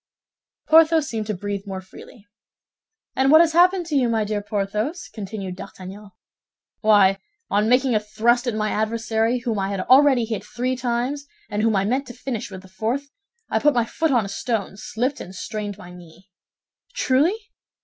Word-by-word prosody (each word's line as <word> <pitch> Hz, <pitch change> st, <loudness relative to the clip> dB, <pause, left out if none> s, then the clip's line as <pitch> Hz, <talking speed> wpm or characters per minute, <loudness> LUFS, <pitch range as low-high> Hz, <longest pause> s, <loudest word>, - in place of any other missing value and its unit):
Porthos 320 Hz, -1 st, +5 dB
seemed 220 Hz, -2 st, -4 dB
to 215 Hz, -, -2 dB
breathe 200 Hz, +1 st, -5 dB
more 190 Hz, -1 st, -4 dB
freely. 190 Hz, +3 st, -14 dB, 0.9 s
"And 265 Hz, 0 st, +2 dB
what 315 Hz, +2 st, +8 dB
has 330 Hz, -1 st, +4 dB
happened 360 Hz, +1 st, +4 dB
to 315 Hz, -3 st, -3 dB
you, 255 Hz, -4 st, +3 dB
my 225 Hz, -2 st, +1 dB
dear 210 Hz, 0 st, -2 dB
Porthos?" 210 Hz, -, -3 dB
continued 195 Hz, -3 st, -6 dB
D'Artagnan. 195 Hz, +2 st, -10 dB, 0.7 s
"Why, 200 Hz, -3 st, +4 dB, 0.3 s
on 210 Hz, +2 st, +2 dB
making 250 Hz, +1 st, +3 dB
a 215 Hz, -, +3 dB
thrust 230 Hz, +4 st, +1 dB
at 235 Hz, -, -1 dB
my 215 Hz, 0 st, -1 dB
adversary, 225 Hz, +2 st, 0 dB
whom 230 Hz, -4 st, -2 dB
I 195 Hz, 0 st, -1 dB
had 200 Hz, -2 st, -2 dB
already 260 Hz, +1 st, +5 dB
hit 220 Hz, -2 st, -4 dB
three 255 Hz, +3 st, -2 dB
times, 255 Hz, +3 st, -2 dB, 0.2 s
and 210 Hz, -, -1 dB
whom 220 Hz, -1 st, +2 dB
I 195 Hz, 0 st, +1 dB
meant 260 Hz, +6 st, -1 dB
to 245 Hz, -, -8 dB
finish 245 Hz, -4 st, -5 dB
with 190 Hz, -1 st, -9 dB
the -, -, -14 dB
fourth, 235 Hz, +9 st, -3 dB, 0.4 s
I -, -, +2 dB
put 295 Hz, -2 st, +3 dB
my 240 Hz, -2 st, +2 dB
foot 320 Hz, +7 st, -1 dB
on 240 Hz, -6 st, +2 dB
a -, -, -5 dB
stone, 200 Hz, 0 st, -3 dB
slipped, 240 Hz, +6 st, -3 dB
and 185 Hz, -, -9 dB
strained 205 Hz, +1 st, -5 dB
my 180 Hz, -4 st, -12 dB
knee." 180 Hz, +2 st, -15 dB, 0.6 s
"Truly?" 295 Hz, -, +2 dB
220 Hz, 180 wpm, -22 LUFS, 205-260 Hz, 0.9 s, what